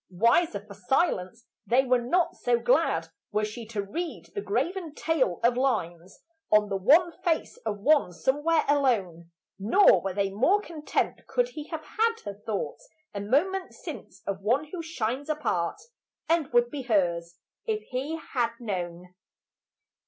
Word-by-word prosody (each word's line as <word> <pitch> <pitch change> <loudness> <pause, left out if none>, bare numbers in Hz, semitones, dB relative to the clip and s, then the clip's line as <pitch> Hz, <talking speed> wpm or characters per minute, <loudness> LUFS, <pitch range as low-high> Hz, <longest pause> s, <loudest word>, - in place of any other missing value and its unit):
Wiser 230 - +3
for 210 - -11
silence, 230 - 0 0.2
they 250 +3 +4
were 250 -1 +3
not 340 +9 +1
so 245 -1 +1
glad 235 - +2 0.2
Were 210 +1 +1
she 220 +1 -7
to 215 -3 -3
read 330 - -5
the 405 - -3
graven 370 -6 -2
tale 270 - 0
of 240 +1 +4
lines 190 -9 -2 0.3
On 210 -1 +5
the 200 - -1
wan 300 - +5
face 330 -2 0
of 205 -1 -1
one 285 -5 +4
somewhere 295 - +1
alone; 205 - +1 0.3
Nor 210 - +5
were 190 -1 -3
they 200 -1 0
more 265 - +3
content 330 -7 -3
could - - +1
he 305 -10 -7
have 320 -2 -6
had 455 +1 +1
Her 205 - -4
thoughts 215 - -5 0.2
a 200 - -4
moment 355 - 0
since - - -9
of 195 -1 -3
one 265 +9 0
who 360 - -4
shines 280 -3 -3
Apart, 300 - -1 0.5
and 325 -3 +1
would 240 0 +3
be 290 - -4
hers 175 -8 0 0.3
if 435 -1 -1
he 270 +5 -2 0.2
had 235 -3 +1
known. 180 -5 -5
245 Hz, 155 wpm, -27 LUFS, 200-320 Hz, 0.5 s, On